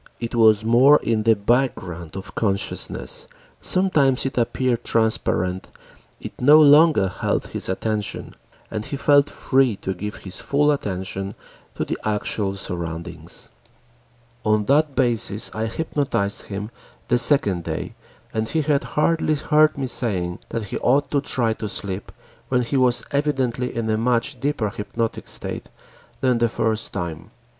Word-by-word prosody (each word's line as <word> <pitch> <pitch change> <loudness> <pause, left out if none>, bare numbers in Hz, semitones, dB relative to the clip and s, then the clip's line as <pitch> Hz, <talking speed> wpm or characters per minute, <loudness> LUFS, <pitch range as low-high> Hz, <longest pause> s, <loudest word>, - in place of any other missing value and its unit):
It 115 0 -5
was 110 -2 +4
more 130 +6 +6
in 110 -1 +1
the 110 +1 +4
background 100 -7 -1
of 95 0 -8
consciousness, 100 -3 -3 0.3
sometimes 150 -10 +2
it 135 - -2
appeared 120 0 0
transparent, 95 -5 0 0.5
it - - -8
no 145 +4 +7
longer 150 -6 +6
held 90 - -2
his - - -3
attention, 105 +2 -3 0.4
and 110 -1 -3
he 140 - -5
felt 145 +1 +4
free 130 -4 +1
to 95 0 -4
give 105 +3 -6
his 95 -1 -7
full 145 +1 +2
attention 95 -5 -4 0.4
to - - -2
the - - -4
actual 105 -1 -1
surroundings. 85 -2 -6 0.9
On 105 -1 +2
that 145 +2 +2
basis 115 -4 +2
I 110 +1 -2
hypnotized 130 -6 -2
him 105 +2 -6 0.4
the 125 - +2
second 105 - +3
day - - -4 0.4
and 110 0 -1
he 160 -1 0
had 145 -1 +1
hardly 155 0 +2
heard 150 +1 +3
me 135 - -2
saying 95 -8 -1
that 115 - -3
he 100 - -5
ought 135 +2 +2
to 140 - +2
try 120 -5 0
to 110 -1 -5
sleep 100 -1 -4 0.4
when 125 -1 +2
he 120 - -3
was 125 -2 +2
evidently 135 -4 -1
in 115 -1 -2
a 110 0 +1
much 125 +3 0
deeper 125 -6 -1
hypnotic 115 +3 -4
state - - -5 0.5
than 125 -3 +2
the 120 0 +2
first 110 0 -1
time. 85 -1 -5
115 Hz, 150 wpm, -22 LUFS, 100-135 Hz, 0.9 s, no